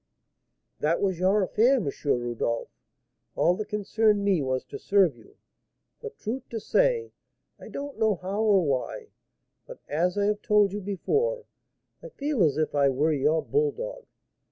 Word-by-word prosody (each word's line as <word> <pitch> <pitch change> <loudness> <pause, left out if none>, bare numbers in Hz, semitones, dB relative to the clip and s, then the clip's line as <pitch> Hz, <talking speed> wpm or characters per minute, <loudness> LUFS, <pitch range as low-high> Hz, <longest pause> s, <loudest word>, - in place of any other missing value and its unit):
"That 155 +3 +1
was 190 -4 0
your 195 +3 +3
affair, 230 +8 +3
M. 230 - -1 0.2
Rodolph; 120 -3 -1 0.7
all 175 - +3
that 215 - -4
concerned 210 0 +1
me 190 -6 +2
was 130 -1 -1
to - - -8
serve 195 -8 +3
you; 115 - -20 0.6
for, 450 - -6
truth 260 - -6
to 230 - -4
say, 475 - +1 0.5
I - - -11
don't 280 -4 -7
know 220 -2 +3
how 190 +4 -3
or 205 -4 +4
why, 135 -3 -2 0.6
but, - - -9
as 175 +6 0
I 200 - +2
have 210 0 0
told 210 -2 +3
you 205 - -4
before, 440 - -1 0.6
I - - -9
feel 290 - -2
as 150 -4 +3
if 155 -1 0
I 140 -1 +3
were 145 +4 +1
your 150 +3 +1
bulldog. 465 +3 -2
205 Hz, 160 wpm, -26 LUFS, 155-255 Hz, 0.7 s, or